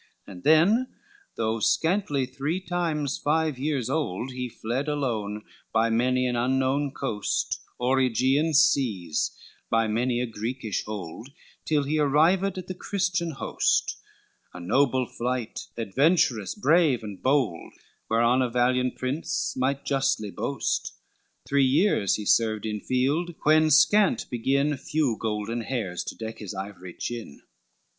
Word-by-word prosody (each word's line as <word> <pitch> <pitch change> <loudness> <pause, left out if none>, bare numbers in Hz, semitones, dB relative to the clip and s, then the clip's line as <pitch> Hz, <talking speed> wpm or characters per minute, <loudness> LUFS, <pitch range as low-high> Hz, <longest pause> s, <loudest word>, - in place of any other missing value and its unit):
LX - - -10
And 90 - -12
then, 190 +12 +4 0.5
though 110 0 -1
scantly 160 - +1
three 150 +8 -3
times 165 -6 -2
five 155 -2 0
years 140 -4 -1
old, 130 - -2
He 125 -1 -4
fled 120 +6 -3
alone, 110 -8 -2 0.3
by 115 +1 +2
many 125 +2 +2
an 125 -1 0
unknown 130 +3 +1
coast, 110 -7 -2 0.2
O'er 130 +2 +2
Aegean 130 +5 +2
Seas 105 - +2 0.3
by 115 0 +2
many 120 +3 0
a 125 - 0
Greekish 115 -1 -4
hold, 105 +3 -7 0.4
Till 150 -2 +1
he 150 +3 0
arrived 165 +7 +3
at 185 - -5
the 185 - -5
Christian 185 -2 -1
host; 140 - 0 0.6
A - - -7
noble 130 +7 +2
flight, 120 -1 -4
adventurous, 120 - +1
brave, 160 - +3
and 105 -3 -8
bold, 130 - 0 0.4
Whereon 120 +3 +3
a 125 - +1
valiant 125 +1 +1
prince 130 +5 -2
might 135 +2 -1
justly 135 -7 0
boast, 135 +7 -2 0.5
Three 140 0 +3
years 130 - +3
he 105 - -5
served 110 0 +2
in 105 -1 -2
field, 145 +9 0
when 155 +1 +5
scant 195 +7 +4
begin 140 +4 +1
Few 140 -3 0
golden 110 +1 -2
hairs 110 -8 -3
to - - -6
deck 110 0 -7
his 105 -2 -6
ivory 95 -2 -7
chin. 115 -11 -6
130 Hz, 135 wpm, -26 LUFS, 115-150 Hz, 0.6 s, when